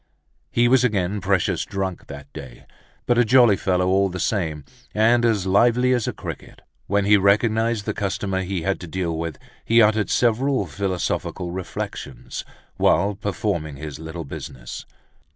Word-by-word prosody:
He 120 0 +3
was 130 0 +4
again 100 -4 0
precious 95 -2 +1
drunk 95 -2 -4
that 70 0 -10
day, 60 -2 -10 0.4
but 120 0 +2
a - - +6
jolly 120 -3 +5
fellow 90 -1 0
all 95 +1 +3
the 90 +1 -6
same, 80 -8 -1 0.3
and 115 +3 +4
as 110 -5 +2
lively 120 +6 +3
as 120 -3 0
a - - 0
cricket. - - -9 0.2
When 100 0 +1
he 105 0 +6
recognized 110 +2 +2
the - - -1
customer 95 -1 -2
he 95 -2 -3
had 95 +2 0
to 90 - -8
deal 85 -1 -2
with 80 -2 -4 0.3
he 115 +1 +4
uttered 105 -1 +3
several 120 +2 +2
philosophical 90 0 -3
reflections, 90 0 -6 0.4
whilst 100 +1 +2
performing 90 -8 -2
his 75 0 -7
little 80 +1 -6
business. 65 -2 -8
100 Hz, 155 wpm, -22 LUFS, 90-110 Hz, 0.4 s, a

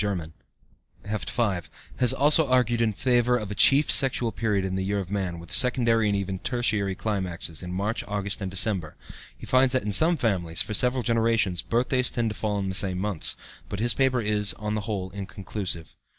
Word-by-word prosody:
III, 90 -6 -3 0.7
Heft 105 0 -4
5) 100 -8 -2 0.3
has 125 -2 +4
also 150 +2 +4
argued 120 -2 +1
in 115 -2 +2
favor 125 +2 +1
of 105 -4 -6
a - - -2
chief 140 +7 +4
sexual 130 -4 +6
period 105 -5 -1
in 95 - -4
the 95 0 -2
year 100 +2 -2
in 95 0 -6
man, 95 -4 -3
with 85 0 -11
secondary 115 -3 +2
and 100 - 0
even 95 -1 -3
tertiary 105 -6 0
climaxes, 90 -6 -4
in 90 -1 -7
March, 100 +5 -2
August, 105 0 -3
and 95 - -3
December. 95 -4 -1 0.4
He - - -10
finds 130 0 +3
that 130 - 0
in 105 - -3
some 160 - +3
families, 90 - 0
for 105 - -6
several 125 +3 +1
generations, 115 -5 +1
birthdays 125 +2 0
tend 115 -3 -2
to - - -7
fall 105 -2 -2
in 95 -1 -3
the - - -3
same 95 -1 +1
months, 95 -3 0 0.3
but 100 - -5
his 120 +1 +3
paper 130 -2 +1
is, 105 -1 0
on 105 0 -4
the 110 - -2
whole, 95 -3 -4
inconclusive. 95 -3 -5
105 Hz, 200 wpm, -25 LUFS, 95-120 Hz, 0.7 s, sexual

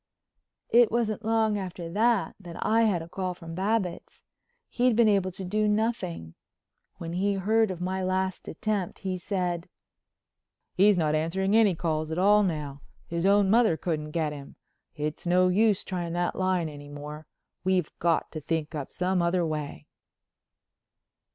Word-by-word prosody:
It 235 -1 +6
wasn't 225 -1 -1
long 220 -1 +1
after 180 -3 -6
that 220 +4 +1
that 175 -4 -10
I 225 +1 +4
had 180 -6 +1
a - - -10
call 185 +1 -3
from 165 -2 -9
Babbitts. 195 0 -2 0.4
He'd 245 -1 +2
been 235 0 +5
able 195 -3 +2
to 185 +1 -7
do 210 +3 +1
nothing. 210 - -1 0.6
When 165 0 -6
he 200 +3 +1
heard 220 +3 +2
of 185 -2 -5
my 185 +1 -2
last 185 0 -1
attempt 200 +1 -2
he 185 -1 -2
said: 175 -3 -2 1.0
"He's 200 +1 +5
not 155 -3 +1
answering 190 +6 0
any 215 -5 +5
calls 155 -2 -2
at 160 - -3
all 205 +3 +5
now. 150 -7 -3 0.2
His 170 +2 -1
own 200 -1 +4
mother 225 -7 +4
couldn't 155 -3 -3
get 155 -1 -1
him. 140 -1 -10 0.4
It's 150 +2 -4
no 180 +1 +4
use 210 +1 +3
trying 175 -3 -4
that 175 0 -1
line 185 -3 0
any 145 -1 -10
more. 150 +1 -8 0.4
We've 185 -1 +1
got 170 -1 +1
to 155 - -6
think 160 0 -2
up 145 -3 -5
some 180 0 0
other 170 0 +1
way." 150 - -4
185 Hz, 160 wpm, -27 LUFS, 165-205 Hz, 1.0 s, It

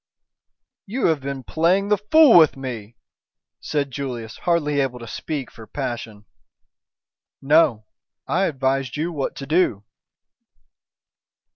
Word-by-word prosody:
"You 240 +6 -2
have 160 -2 +1
been 135 -1 -5
playing 180 +8 +1
the 210 - +3
fool 300 +4 +6
with 160 -5 +6
me," 120 -4 -7 0.6
said 145 -2 -2
Julius, 120 -4 -5
hardly 150 -4 0
able 135 -3 -1
to 120 -1 -10
speak 145 +2 -5
for 110 -1 -13
passion. 115 -6 -6 1.1
"No, 135 -7 +3 0.4
I 185 +3 +1
advised 135 -3 -1
you 165 +3 -2
what 145 -5 -3
to 135 - -7
do!" 155 - +1
140 Hz, 120 wpm, -22 LUFS, 125-165 Hz, 1.1 s, fool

